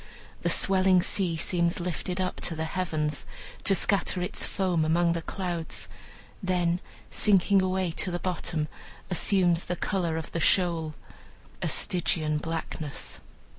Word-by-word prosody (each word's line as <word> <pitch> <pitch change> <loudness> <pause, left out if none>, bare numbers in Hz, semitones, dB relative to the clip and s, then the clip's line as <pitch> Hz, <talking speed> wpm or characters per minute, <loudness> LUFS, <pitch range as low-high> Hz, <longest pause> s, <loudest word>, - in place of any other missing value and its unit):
The - - +1
swelling 190 -2 +5
sea 175 -5 0
seems 170 +1 0
lifted 180 +1 -3
up 185 -1 -1
to 170 - -1
the 160 - -2
heavens, 160 -3 -2 0.4
to 195 - +4
scatter 195 -1 +1
its 180 - 0
foam 180 -5 0
among 170 +2 +2
the 170 - -2
clouds; 175 -2 -3 0.5
then 180 -2 +1 0.3
sinking 200 -1 +4
away 185 -1 0
to 185 - +1
the 175 - -1
bottom 170 -3 -2 0.4
assumes 175 -1 +3
the 180 - -2
color 175 -4 -1
of 160 - -5
the 165 - -2
shoal 165 -3 +3 0.7
a - - 0
Stygian 155 -4 0
blackness. 160 -2 -4
175 Hz, 135 wpm, -27 LUFS, 165-185 Hz, 0.7 s, swelling